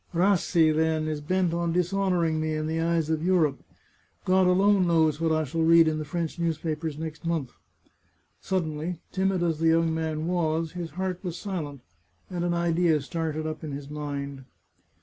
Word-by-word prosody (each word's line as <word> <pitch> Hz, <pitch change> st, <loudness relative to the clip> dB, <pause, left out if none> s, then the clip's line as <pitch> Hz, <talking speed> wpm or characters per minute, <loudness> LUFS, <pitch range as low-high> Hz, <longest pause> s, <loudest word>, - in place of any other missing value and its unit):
Rassi, 175 Hz, -3 st, +3 dB
then, 160 Hz, 0 st, +1 dB
is 155 Hz, -1 st, -3 dB
bent 180 Hz, +2 st, 0 dB
on 170 Hz, -1 st, 0 dB
dishonouring 180 Hz, -3 st, +1 dB
me 155 Hz, 0 st, -1 dB
in 155 Hz, 0 st, -2 dB
the 160 Hz, +1 st, -1 dB
eyes 165 Hz, -1 st, +1 dB
of 160 Hz, 0 st, -1 dB
Europe. 170 Hz, -5 st, +2 dB, 0.7 s
God 185 Hz, 0 st, +4 dB
alone 190 Hz, 0 st, +4 dB
knows 160 Hz, -2 st, +2 dB
what 165 Hz, -1 st, +2 dB
I 155 Hz, 0 st, +2 dB
shall 160 Hz, +3 st, -2 dB
read 165 Hz, 0 st, +6 dB
in 155 Hz, 0 st, 0 dB
the 155 Hz, -, -4 dB
French 170 Hz, +1 st, -3 dB
newspapers 160 Hz, -2 st, -2 dB
next 160 Hz, 0 st, -6 dB
month." 165 Hz, -7 st, -2 dB, 0.9 s
Suddenly, 165 Hz, -2 st, -2 dB
timid 190 Hz, -1 st, 0 dB
as 165 Hz, -3 st, 0 dB
the 165 Hz, -, +2 dB
young 165 Hz, 0 st, +3 dB
man 160 Hz, -1 st, -2 dB
was, 165 Hz, -2 st, 0 dB
his 175 Hz, -2 st, -5 dB
heart 185 Hz, -1 st, -3 dB
was 175 Hz, -2 st, -4 dB
silent, 155 Hz, -9 st, -5 dB, 0.5 s
and 175 Hz, -1 st, -2 dB
an 175 Hz, 0 st, 0 dB
idea 170 Hz, -2 st, +2 dB
started 155 Hz, +1 st, -3 dB
up 155 Hz, 0 st, -5 dB
in 150 Hz, -2 st, -5 dB
his 140 Hz, +1 st, -7 dB
mind. 140 Hz, -2 st, -5 dB
165 Hz, 175 wpm, -26 LUFS, 155-175 Hz, 0.9 s, read